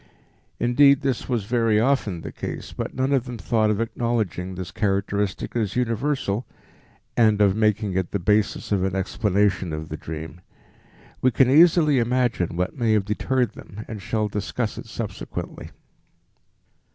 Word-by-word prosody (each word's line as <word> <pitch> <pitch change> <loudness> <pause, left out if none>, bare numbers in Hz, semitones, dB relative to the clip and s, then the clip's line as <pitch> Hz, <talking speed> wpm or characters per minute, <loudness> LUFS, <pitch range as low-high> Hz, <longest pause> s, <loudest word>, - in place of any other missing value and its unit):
Indeed, 140 +4 +5
this 135 -3 -2
was 120 -5 0
very 115 -2 +2
often 110 -8 +1
the - - -7
case, - - -6
but - - -5
none 130 +2 +1
of 130 -3 +2
them 125 -2 -6
thought 110 -1 +1
of 105 -1 0
acknowledging 110 -6 -2
this 90 -2 -6
characteristic 100 -1 -1
as 105 -5 -1
universal 125 -2 -1 0.7
and 110 -3 +4
of 100 -2 +4
making 105 -2 +1
it 95 -1 -1
the - - -1
basis 105 +3 0
of 100 -2 +2
an 95 0 -1
explanation 95 -2 0
of 80 0 -5
the 80 - -5
dream. 80 +2 -7 0.8
We 130 - +4
can 125 +3 +3
easily 155 -2 +6
imagine 120 -8 0
what 90 +1 -1
may 115 -5 +1
have 105 -3 +2
deterred 120 +2 0
them 105 +3 -10
and 110 -3 -7
shall 110 +2 -1
discuss 105 +2 -3
it - - -9
subsequently. - - -6
110 Hz, 155 wpm, -24 LUFS, 95-125 Hz, 0.8 s, easily